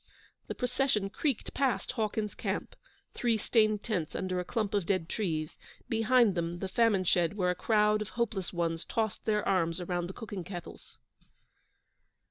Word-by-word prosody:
The - - -4
procession 250 -5 0
creaked 275 -2 -1
past 270 -3 0
Hawkins's 215 -3 -1
camp - - -3 0.4
three 235 -2 +1
stained 215 -1 +2
tents 180 -9 -2
under 185 -1 -1
a - - -1
clump 210 +2 -2
of 200 -5 0
dead 185 -5 +1
trees; 160 -6 -2 0.3
behind 225 -1 +4
them 170 -1 -2
the 190 - -3
famine 205 -1 +3
shed 175 0 +2
where 180 -2 +2
a - - -2
crowd 210 +1 +3
of 215 - -4
hopeless 215 -6 -1
ones 165 -2 -1
tossed 220 -3 -2
their 210 -1 +1
arms 170 -3 +1
around 175 -1 -2
the 190 - -7
cooking 205 -5 -6
kettles. 175 -1 -9
200 Hz, 160 wpm, -31 LUFS, 180-225 Hz, 0.4 s, behind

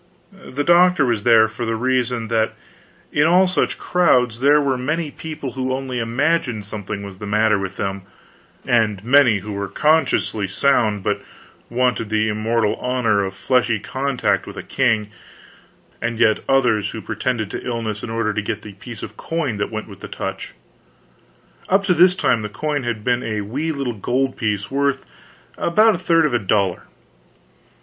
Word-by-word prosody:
The 145 +3 -5
doctor 175 -2 +5
was 115 -4 0
there 115 -1 +5
for 110 +2 -6
the 115 -1 -1
reason 125 -1 0
that 110 -1 0 0.6
in 145 +2 +3
all 180 +3 +5
such 180 - 0
crowds 125 -10 +2
there 145 +3 +5
were 140 -3 +1
many 150 +5 -2
people 150 -4 -6
who 130 0 -3
only 130 -2 -3
imagined 120 -1 0
something 100 -1 -6
was 100 -2 -9
the 105 - -6
matter 105 0 +2
with 95 0 -5
them, 100 0 -3 0.6
and 110 -5 +1
many 125 -6 +5
who 105 +2 -7
were 100 0 -3
consciously 150 - +1
sound 105 -2 +1
but 105 0 -1 0.5
wanted 120 -2 0
the 110 0 +1
immortal 110 +1 0
honor 115 -5 +1
of 95 0 -5
fleshly 120 0 +1
contact 130 +4 -1
with - - -9
a - - -5
king, 110 -5 0 0.9
and 115 -1 -2
yet 110 - +4
others 125 -7 +2
who - - -6
pretended 110 -5 -3
to - - -5
illness 115 -4 -3
in - - -6
order 115 -1 -1
to 110 - -1
get 105 +1 -4
the 105 - -9
piece 110 +3 -10
of - - -8
coin 155 -9 -2
that 100 - -2
went 110 -1 -5
with 100 -3 -12
the - - -8
touch. - - -6 1.2
Up 195 +1 +3
to 185 - +2
this 180 +2 +5
time 120 -10 +1
this 105 -1 -5
coin 145 +5 -2
had 120 -4 -3
been 125 +1 +1
a 110 -3 -3
wee 140 +11 -3
little 140 -5 -3
gold 130 +5 -1
piece 105 -1 -2
worth 140 0 0 0.5
about 215 +6 +4
a 175 - -3
third 165 -3 +3
of 150 - 0
a 120 - +2
dollar. 100 -3 0
120 Hz, 175 wpm, -20 LUFS, 105-140 Hz, 1.2 s, doctor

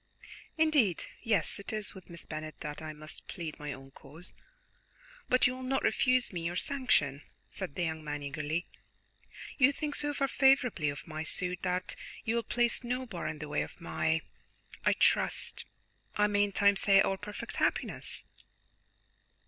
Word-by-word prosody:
"Indeed, 295 - +3 0.2
yes, 220 -3 +1
it 200 - -6
is 215 -1 -1
with 190 -3 -13
Miss 170 -1 -7
Bennet 155 0 -6
that 150 0 -5
I 155 0 -5
must 155 0 -7
plead 165 -3 -6
my 150 -1 -4
own 135 0 -9
cause; 155 +7 -10 1.0
but 255 - +5
you 250 - +4
will 260 - -8
not 265 +1 0
refuse 255 -4 +3
me 170 -2 -3
your 170 +1 -2
sanction?" 180 - +1 0.3
said 140 - -5
the 180 - 0
young 160 -1 -2
man, 145 -1 -4
eagerly. 150 +4 -2 0.9
"You 275 +1 +7
think 295 +1 -3
so 295 0 +1
far 275 -1 +1
favourably 265 - +4
of 145 0 -6
my 155 -1 -5
suit 180 +2 0
that 180 0 -1 0.3
you 225 - +1
will 235 - +2
place 240 +1 +1
no 250 +2 -2
bar 220 -9 -4
in 155 0 -3
the 150 0 -6
way 150 - 0
of - - -7
my 165 -1 0 0.6
I - - +4
trust - - +2 0.5
I 210 - +4
may 205 0 +3
in 200 - -5
time 200 0 +4
say 195 -1 +6
our 195 - +1
perfect 205 +1 -6
happiness?" - - 0
185 Hz, 175 wpm, -31 LUFS, 155-240 Hz, 1.0 s, You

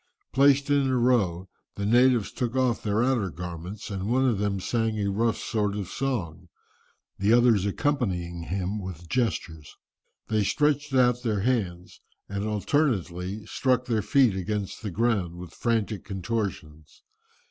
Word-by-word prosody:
"Placed 140 +1 +4
in 140 -1 +3
a 130 -1 +1
row, 100 -8 +2 0.3
the 100 - -3
natives 120 0 +4
took 125 -1 -3
off 130 -3 +1
their 105 +2 +1
outer 120 -7 +1
garments, 90 +5 -7
and 100 +1 -3
one 130 +2 +3
of 115 -6 +1
them 100 -1 0
sang 115 +2 -1
a 100 -1 0
rough 115 +3 +1
sort 105 -3 -1
of 100 -3 -4
song, 90 -10 -3 0.7
the 100 +2 +2
others 115 -4 +4
accompanying 95 - -1
him 95 +3 -2
with 90 -2 -8
gestures. 85 - -2 0.5
They 110 -1 +1
stretched 150 +5 +1
out 125 -1 +4
their 110 -5 -1
hands, 95 -7 -2 0.3
and 100 0 -3
alternately 105 - -1
struck 125 -2 0
their 115 -3 0
feet 125 -3 +3
against 100 +1 -3
the 110 - -4
ground 100 -4 0
with 90 -1 -9
frantic 115 -3 -1
contortions. 95 -7 -5
105 Hz, 145 wpm, -26 LUFS, 95-125 Hz, 0.7 s, Placed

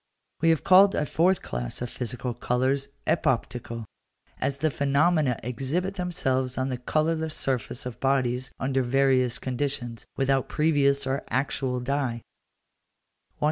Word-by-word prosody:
We 165 - +4
have 160 -2 +2
called 195 +2 +7
a 150 - +1
fourth 175 +4 +2
class - - -4
of 125 - -3
physical 125 0 -4
colours 130 +4 0 0.2
epoptical, 120 -6 -1 0.5
as 140 0 -1
the 155 +2 +1
phenomena 140 -1 +2
exhibit 135 - -2
themselves 130 -9 -1
on 130 +1 0
the 125 -2 -3
colourless 155 +4 0
surface 130 0 -2
of 125 -1 -6
bodies 130 -2 +1
under 135 0 +1
various 130 -1 +2
conditions, 125 -3 -3
without 135 -1 +1
previous 140 -3 +2
or 135 +1 -1
actual 130 0 -1
dye 125 -3 -1
(βαφή). - - -48
135 Hz, 135 wpm, -26 LUFS, 125-145 Hz, 0.5 s, called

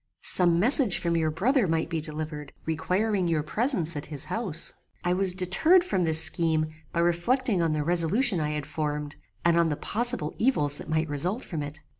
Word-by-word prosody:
Some 175 -2 +5
message 235 -1 +3
from 170 -1 -1
your 160 -1 +1
brother 220 - +1
might 160 0 -1
be 165 -2 -3
delivered, 150 -1 -7
requiring 185 +4 -1
your 160 -3 0
presence 175 - -2
at 145 +1 -5
his 145 -3 -8
house. 190 -8 -2 0.3
I 175 - +1
was 185 -1 +3
deterred 195 - +3
from 190 - -1
this 160 0 +4
scheme 160 -2 +1 0.2
by 170 - -1
reflecting 190 +5 +1
on 165 -2 0
the 150 -1 -1
resolution 175 - +2
I 150 -1 -1
had 150 -1 -4
formed, 150 0 -4 0.3
and 170 0 +3
on 170 -1 +2
the 150 - -3
possible 240 -7 -1
evils 150 - +2
that - - -9
might 160 0 0
result 175 - -2
from 160 -5 -5
it. 145 +1 -8
170 Hz, 190 wpm, -26 LUFS, 155-195 Hz, 0.3 s, Some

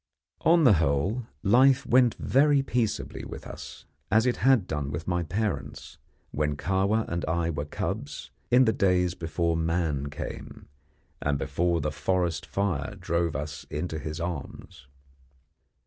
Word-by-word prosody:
On 165 0 +5
the 125 -7 +7
whole, 90 - 0 0.2
life 130 +6 +5
went 125 -1 +4
very 140 +1 +3
peaceably 120 -5 -2
with - - -8
us, 75 +3 -9 0.2
as 110 +2 +4
it 125 - +1
had 130 -5 +4
done 75 -5 -3
with 75 +4 -5
my 90 -1 +1
parents 95 -2 -4 0.3
when 75 -1 -1
Kahwa 100 +6 +1
and 85 0 -3
I 85 +1 0
were 75 -2 -3
cubs 75 - -5 0.2
in 125 +1 +6
the 110 - +3
days 90 -2 +2
before 85 0 -1
man 80 -4 -1
came, 75 - -8 0.5
and 70 0 0
before 85 +2 0
the 75 0 -1
forest 90 -1 -1
fire 90 -8 -2
drove 85 -1 -1
us 70 +1 -5
into 80 +1 -3
his 75 +2 -5
arms. 85 -2 -6
85 Hz, 145 wpm, -27 LUFS, 75-110 Hz, 0.5 s, the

